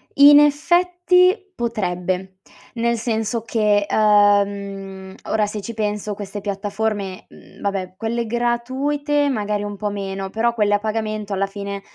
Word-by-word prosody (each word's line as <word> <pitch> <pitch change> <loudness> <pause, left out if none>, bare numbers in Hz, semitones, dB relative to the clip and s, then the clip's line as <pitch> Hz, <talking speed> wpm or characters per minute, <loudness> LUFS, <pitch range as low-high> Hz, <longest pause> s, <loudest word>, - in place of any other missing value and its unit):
in 290 +1 +9
effetti 355 +5 +3 0.2
potrebbe. 185 -4 -3 0.4
Nel 235 0 0
senso 225 0 -2
che, 210 -2 +1
uhm, 200 -2 +1
ora, 215 -1 +1
se 210 0 -5
ci 230 +3 -6
penso, 210 -1 -2
queste 205 0 -6
piattaforme, 200 -1 -3
mhmm - - -17 0.2
vabbè, 190 -2 -3
quelle 230 +3 -2
gratuite 265 +5 0
magari 210 -4 -1
un 205 0 -5
po' 210 +1 -2
meno, 195 -1 -4
però 230 +4 0
quelle 210 -3 +2
a - - 0
pagamento 215 -1 -3
alla 195 0 0
fine, 200 0 -6
210 Hz, 135 wpm, -21 LUFS, 200-235 Hz, 0.4 s, in